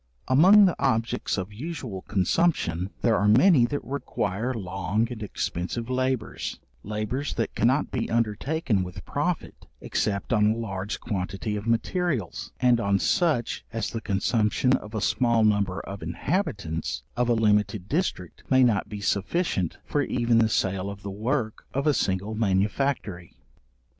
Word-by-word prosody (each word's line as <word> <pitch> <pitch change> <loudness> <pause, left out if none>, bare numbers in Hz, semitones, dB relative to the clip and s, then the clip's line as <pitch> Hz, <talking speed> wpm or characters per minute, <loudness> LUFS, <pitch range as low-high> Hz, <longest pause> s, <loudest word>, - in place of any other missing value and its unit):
Among 185 +11 +7
the 180 - +2
objects 115 -6 0
of 95 +2 -4
usual 125 - -6
consumption, 95 - +1
there 115 -2 +4
are 105 - +2
many 125 - +6
that 145 +3 -3
require 120 -4 -2
long 95 0 -1
and 115 -3 -6
expensive 105 +3 -3
labours, 130 -2 -2 0.2
labours 110 +7 -3
that 115 - -2
cannot 130 +6 +2
be 120 - -2
undertaken 115 - 0
with 90 +1 -8
profit, 160 +4 -3
except 100 +3 -1
on 105 -1 +4
a - - -5
large 100 -3 -4
quantity 100 +1 -3
of 105 +2 -5
materials, 115 - -1
and 125 -1 +4
on 100 -3 +2
such 150 - +1
as 115 -1 -3
the 115 - -4
consumption 105 +4 +1
of 105 +1 -6
a 110 - -1
small 120 0 +2
number 100 -3 +1
of 100 +1 -8
inhabitants 100 - -2
of 125 0 +1
a 120 - +4
limited 105 -3 +1
district, 140 - -2
may 130 -1 +5
not 105 -4 +2
be 105 -1 -6
sufficient 100 - 0
for 145 - 0
even 120 -3 +2
the 110 -1 +3
sale 95 -2 0
of 100 0 -9
the 100 - -5
work 110 +2 -2
of 140 +2 0
a 150 - +4
single 95 -2 -1
manufactory. 100 - -1
110 Hz, 150 wpm, -26 LUFS, 100-130 Hz, 0.2 s, Among